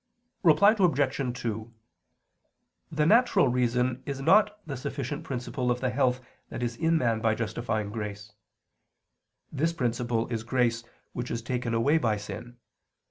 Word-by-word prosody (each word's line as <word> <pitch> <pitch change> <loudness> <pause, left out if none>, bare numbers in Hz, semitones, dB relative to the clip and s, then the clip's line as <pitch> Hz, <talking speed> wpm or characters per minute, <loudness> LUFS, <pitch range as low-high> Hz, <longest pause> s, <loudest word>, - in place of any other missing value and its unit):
Reply 190 +5 +6
Obj. 140 -7 +1
2: 110 0 -4 1.2
The 150 -1 +1
natural 210 - +4
reason 125 +1 0
is 140 -1 -3
not 210 +8 +4
the 145 -4 -5
sufficient 140 +4 -4
principle 125 -2 -3
of 120 0 +1
the 130 -1 -1
health 130 -1 +1 0.3
that - - -5
is 120 -1 -2
in 165 +5 +2
man 115 -6 +1
by 110 -1 +2
justifying 110 -2 -2
grace. 105 -1 -6 1.2
This 160 +4 0
principle 120 -5 -1
is 115 -2 -2
grace 120 -1 0 0.3
which 120 0 -4
is 115 0 -3
taken 120 -1 -2
away 140 +8 +3
by 110 -7 +1
sin. 120 +4 -8
125 Hz, 140 wpm, -28 LUFS, 115-145 Hz, 1.2 s, Reply